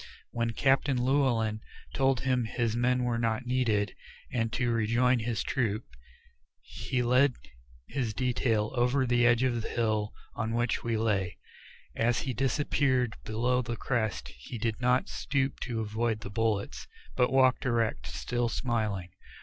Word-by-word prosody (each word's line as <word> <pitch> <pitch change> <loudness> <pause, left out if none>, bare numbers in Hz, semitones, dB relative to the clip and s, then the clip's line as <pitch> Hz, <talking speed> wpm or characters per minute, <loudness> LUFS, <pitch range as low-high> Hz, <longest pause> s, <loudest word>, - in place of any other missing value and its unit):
When 115 -1 -1
Captain 135 +2 +2
Llewellyn 120 -5 +1 0.3
told 135 -3 +2
him 130 -2 +1
his 115 -1 -1
men 125 +1 +2
were 120 -1 0
not 115 +1 0
needed, 120 -5 +1 0.4
and 115 -2 0
to 120 -2 +1
rejoin 120 +3 +2
his 115 0 -2
troop, 115 -4 -1 0.8
he 125 -2 -2
led 125 +2 +4 0.5
his 120 -6 -2
detail 120 -4 +1
over 125 +2 +2
the 120 -1 +3
edge 120 +1 +4
of 120 -3 +1
the - - -5
hill 110 -3 0 0.2
on 115 +1 -2
which 120 0 0
we 115 -1 0
lay. 100 -5 0 0.6
As 120 +1 +1
he 130 - -3
disappeared 130 -1 +1
below 120 +4 +1
the 115 -1 -4
crest 110 - -1
he 70 - -9
did 115 +1 -2
not 125 +1 +2
stoop 135 -2 -1
to 115 -3 -3
avoid 110 +1 -1
the 100 - -7
bullets, 110 -1 -1 0.3
but 125 -1 +2
walked 130 0 +3
erect, 115 - 0
still 70 - -2
smiling. 110 -8 -1
120 Hz, 150 wpm, -29 LUFS, 110-125 Hz, 0.8 s, led